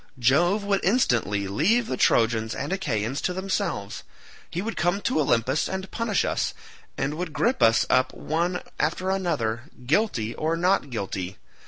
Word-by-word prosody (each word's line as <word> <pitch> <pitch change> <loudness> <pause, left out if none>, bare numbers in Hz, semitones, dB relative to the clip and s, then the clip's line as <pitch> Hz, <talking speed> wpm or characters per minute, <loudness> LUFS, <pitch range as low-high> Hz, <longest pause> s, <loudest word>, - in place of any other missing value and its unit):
Jove 175 - +3
would 200 -1 0
instantly 115 - +2
leave 190 - +2
the 130 - -2
Trojans 115 -2 +2
and 145 +7 -3
Achaeans 130 - -1
to 180 - -1
themselves; 180 - -2 0.5
he 170 - -4
would 220 +4 -3
come 175 +4 +1
to - - 0
Olympus 130 0 +2
to 190 0 -4
punish 225 -4 0
us, - - -1 0.4
and 135 +2 -1
would 180 -4 -4
grip 255 +8 +1
us 115 +1 +5
up 130 - +3
one 170 +3 -2 0.2
after 180 +5 0
another, 120 -12 -1 0.2
guilty 130 - +1
or 160 +2 -1
not 180 -4 +2
guilty. 95 -5 -4
155 Hz, 155 wpm, -25 LUFS, 115-190 Hz, 0.5 s, us